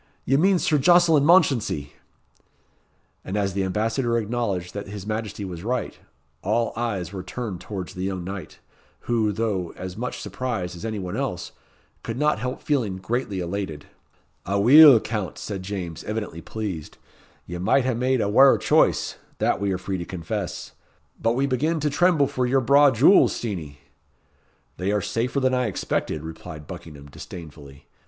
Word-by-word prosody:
Ye 135 - +2
mean 185 +6 +4
Sir 155 -3 +2
Jocelyn 175 -1 +5
Mounchensey." 125 - +3 1.3
And 95 - -4
as 100 -2 0
the 100 0 0
Ambassador 115 +5 0
acknowledged 105 -6 -2
that 100 0 -6
his 100 -1 -7
Majesty 105 -1 -4
was 90 -2 -7
right, 125 +3 -3 0.4
all 115 +4 0
eyes 100 -7 -3
were 95 - -4
turned 95 -1 -6
towards 95 -4 -6
the 90 - -7
young 95 -2 -3
knight, 95 +1 -7 0.4
who, 115 -3 +1
though 100 -5 -2
as 90 -1 -6
much 125 +3 -4
surprised 100 -4 -4
as 85 - -10
any 110 -1 -3
one 90 0 -4
else, 120 -10 -3 0.5
could 115 +1 -5
not 150 -3 +2
help 125 +3 -4
feeling 120 -11 0
greatly 100 0 -2
elated. 85 -4 -4 0.6
"Aweel, 120 - +8
Count," 105 -4 -4
said 100 -3 -5
James, 95 -4 -5
evidently 105 -6 -4
pleased, 100 -8 -6 0.5
"ye 85 0 -6
might 125 +8 +2
hae 130 - +1
made 125 +1 +1
a - - +1
waur 135 +6 +6
choice - - +2 0.2
that - - 0
we 100 -1 0
are 95 - 0
free 95 0 -4
to - - -3
confess. 90 +2 -5 0.5
We 120 +4 +2
begin 150 +5 0
to 150 0 0
tremble 165 -1 +3
for 130 -2 -1
your 135 +2 +2
braw 140 +3 +6
jewels, 135 - +5
Steenie." 85 -11 -5 1.0
"They 95 +3 -1
are 105 - +2
safer 125 +4 -1
than 130 -1 +1
I 125 -1 +1
expected," 80 -5 -2
replied 80 -1 -9
Buckingham, 75 -1 -10
disdainfully. 70 -2 -11
105 Hz, 160 wpm, -24 LUFS, 95-125 Hz, 1.3 s, Aweel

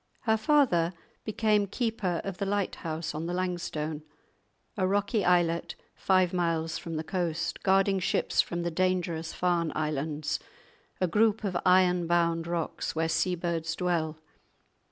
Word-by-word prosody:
Her 220 -2 +2
father 220 - +3 0.3
became 215 -1 +2
keeper 215 -5 -1
of 195 -2 -5
the 200 - 0
lighthouse 165 -5 -2
on 155 +2 -4
the 175 - -2
Langstone, 170 -4 -3 0.7
a 190 -4 +1
rocky 200 +2 +1
islet 175 -2 +2 0.2
five 185 -1 +2
miles 165 -2 0
from 165 -3 -6
the 155 - -2
coast, 165 -1 -2
guarding 195 0 +3
ships 185 - +2
from 170 0 -4
the 170 - -1
dangerous 175 -2 0
Farne 175 -2 0
Islands, 150 0 -2 0.6
a 185 - +3
group 215 +5 +2
of 195 -3 -2
iron 180 -1 +4
bound 170 -1 +1
rocks 170 -2 -3
where 160 0 +1
seabirds 165 -1 -1
dwell. 165 -3 -1
175 Hz, 135 wpm, -29 LUFS, 165-190 Hz, 0.7 s, iron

